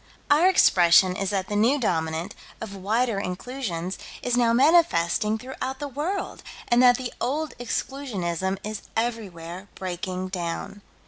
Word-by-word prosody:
Our 320 +6 +6
expression 180 - +5
is 195 0 -2
that 190 -2 -1
the 205 - -3
New 230 +7 +3
Dominant, 165 -3 -1 0.3
of 210 -3 -7
Wider 215 +3 0
Inclusions, 185 -2 -4 0.2
is 245 -1 +1
now 240 -1 +3
manifesting 225 - +3
throughout 260 +2 -5
the 290 - -4
world, 300 +9 -3 0.3
and 240 +1 +5
that 245 -1 +6
the 255 -2 -5
old 290 +3 -1
Exclusionism 195 -8 -2
is 215 0 -5 0.2
everywhere 195 -6 -4
breaking 185 0 -4
down. 180 +2 -4
215 Hz, 135 wpm, -25 LUFS, 185-255 Hz, 0.3 s, Our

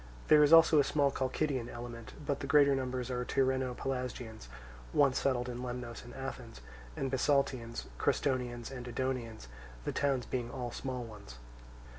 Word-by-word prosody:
There 150 -1 +8
is 145 0 +5
also 165 -2 +8
a - - +6
small 140 0 +2
Chalcidian 130 -2 -1
element; 120 -1 -8
but 140 -1 -1
the 140 - -4
greater 140 -1 +6
number 130 -1 -2
are 125 0 -2
Tyrrheno 130 -1 +1
Pelasgians 125 - -4 0.5
once 140 -2 +4
settled 125 -2 0
in 125 -1 -5
Lemnos 125 -2 -5
and 120 0 -11
Athens, 135 - -7 0.4
and 135 - -2
Bisaltians, 130 -3 +1
Crestonians, 125 -3 0
and 125 -2 -7
Edonians; 120 - -3 0.4
the - - 0
towns 135 -3 0
being 120 -2 -3
all 125 -2 -4
small 130 -1 -4
ones. 105 - -11
130 Hz, 155 wpm, -32 LUFS, 120-135 Hz, 0.5 s, There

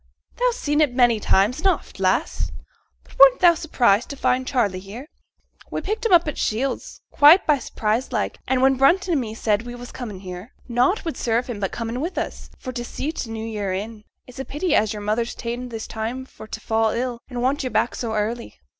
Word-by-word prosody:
'Thou's - - +2
seen 295 -5 +1
it 275 -5 +2
many 240 -3 +4
a - - -7
time 200 +1 +3
and 345 +7 -1
oft, 375 - -1
lass. - - 0 0.5
But - - -19
weren't - - +8
thou 350 -2 +7
surprised 245 -9 +2
to 280 - -5
find 255 0 +1
Charley 210 -9 0
here? 205 +8 -9 0.6
We - - -3
picked 430 +3 -3
him - - -4
up 345 -2 +6
at 300 - -3
Shields, 255 +5 -2
quite 305 +6 +7
by 295 -3 +3
surprise 225 +1 -2
like; - - -2
and 260 -1 +2
when 265 0 +4
Brunton 355 +8 +3
and 300 -5 +2
me 220 -2 -5
said 215 -2 +1
as 240 - -12
we 240 - -6
was 245 0 -9
comin' 210 -7 -7
here, 185 +4 -9
nought 250 - +1
would 325 - -3
serve 235 +1 0
him 235 -5 -6
but 195 -2 -2
comin' 230 +2 -4
with 340 +5 -4
us, - - -4
for 255 - -6
t' 245 -1 -5
see 275 +5 -4
t' 260 -7 -5
new 225 0 -5
year 205 -4 -3
in. 210 +3 -5 0.2
It's 250 0 -13
a - - -2
pity 315 +7 -2
as 215 0 +3
your 210 -2 -5
mother's 225 +3 -1
ta'en 245 +1 -5
this 225 -2 -6
time 230 +4 -4
for 220 - -13
t' 220 - -6
fall 220 0 +1
ill 240 +1 -2
and 245 -2 -4
want 270 +3 +1
yo' 255 - -2
back 245 - +1
so 225 -2 -3
early.' 225 +3 -3
245 Hz, 230 wpm, -23 LUFS, 220-275 Hz, 0.6 s, weren't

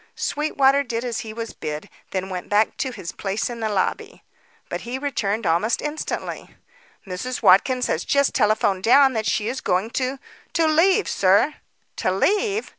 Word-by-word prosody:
Sweetwater 280 -2 +2
did 240 -3 -3
as 235 -2 -2
he 220 - -6
was 230 +1 -6
bid, 150 0 -6 0.2
then 190 0 -3
went 180 -1 -5
back 210 +2 +2
to 265 - -1
his 175 -8 -7
place 200 +4 -3
in 235 - -7
the 220 -1 -1
lobby. 195 -3 -2 0.4
But - - -4
he 245 +2 -4
returned 230 -7 -2
almost 175 +7 +1
instantly. 300 +1 -5 0.5
"Mrs. 220 +7 -5
Watkins 240 +7 +5
has 160 - -1
just 280 -1 +2
telephoned 210 -4 +2
down 265 +5 +5
that 220 -2 -2
she 210 - 0
is 255 +3 -3
going 190 +5 0
to 260 +2 -2 0.4
to 330 - +2
leave, 350 +7 +3
sir." 200 +10 +3 0.4
"To 185 - 0
leave?" 410 - +1
230 Hz, 170 wpm, -22 LUFS, 195-275 Hz, 0.5 s, Watkins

